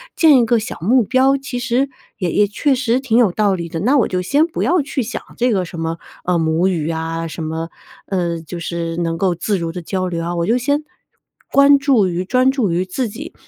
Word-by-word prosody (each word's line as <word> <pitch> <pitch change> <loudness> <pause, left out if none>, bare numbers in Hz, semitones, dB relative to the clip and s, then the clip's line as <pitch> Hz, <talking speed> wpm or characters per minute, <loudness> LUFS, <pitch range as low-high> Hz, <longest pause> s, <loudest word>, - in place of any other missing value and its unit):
建 310 -5 +6
一 235 - +3
个 230 0 +2
小 225 - -6
目 235 +8 +3
标， 260 +4 +3
其 270 -2 -5
实 255 +3 0 0.3
也 180 -4 -1
也 205 0 +3
确 270 +7 +1
实 250 -1 0
挺 240 -3 +1
有 215 -8 +4
道 205 -2 +2
理 170 -2 -3
的， 165 0 -5
那 260 +7 +3
我 245 - +3
就 180 -1 -2
先 290 - +2
不 335 - -3
要 350 -2 +2
去 275 -2 -3
想 230 - -5 0.2
这 245 +1 +2
个 190 -4 0
什 170 0 -9
么， 165 0 -2 0.3
呃， 180 -1 +1
母 165 +3 +1
语 165 -4 -1
啊， 165 0 -3
什 160 0 -6
么， 160 +1 -4 0.4
呃， 170 -3 -2
就 170 +2 -8
是 165 -1 -3
能 165 -1 -1
够 185 -1 +1
自 195 +4 -1
如 165 -2 -4
地 180 - -5
交 185 +2 -2
流 170 -2 -3
啊， 170 +1 -3
我 170 0 0
就 235 +5 +2
先 285 +4 0 0.7
关 280 0 +6
注 270 -8 +3
于 180 0 -2
专 255 +6 +2
注 245 -10 0
于 175 +2 0
自 225 +5 -3
己， 280 +10 -9
195 Hz, 255 characters per minute, -18 LUFS, 170-255 Hz, 0.7 s, 建